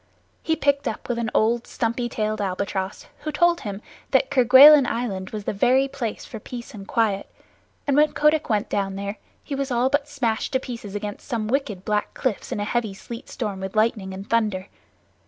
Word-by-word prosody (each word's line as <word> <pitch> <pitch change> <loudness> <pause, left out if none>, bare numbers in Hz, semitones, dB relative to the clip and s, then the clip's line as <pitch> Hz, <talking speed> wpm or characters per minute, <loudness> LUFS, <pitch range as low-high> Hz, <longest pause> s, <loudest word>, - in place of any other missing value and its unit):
He 320 - 0
picked 285 -3 +1
up 220 - -4
with 240 -1 -1
an 230 -1 -1
old 230 +2 +2
stumpy 235 +1 -2
tailed 215 -1 -2
albatross, 190 0 -3
who 305 - -4
told 345 +3 +3
him 205 0 -6 0.3
that 265 0 +2
Kerguelen 265 +2 +8
Island 205 -5 -3
was 215 -1 -5
the - - -2
very 255 +7 +3
place 270 -5 -5
for 225 - -8
peace 240 +4 -8
and 200 -2 -9
quiet, 215 -5 0 0.6
and 280 - +1
when 300 +1 +4
Kotick 300 0 +2
went 210 -2 +1
down 195 -1 -1
there 200 +1 -5 0.2
he 290 - -6
was 275 0 -2
all 245 +1 +2
but 285 0 +1
smashed 250 -6 -2
to 260 - +3
pieces 230 -6 -7
against 205 0 -5
some 230 -5 -2
wicked 215 -7 -2
black 210 -1 -1
cliffs 250 -6 -2
in - - -2
a - - -1
heavy 220 -3 -1
sleet 235 +5 -9
storm 210 -6 -4
with 190 +2 -6
lightning 215 -3 +1
and 195 +2 -8
thunder. 210 -5 0
230 Hz, 195 wpm, -24 LUFS, 205-265 Hz, 0.6 s, Kerguelen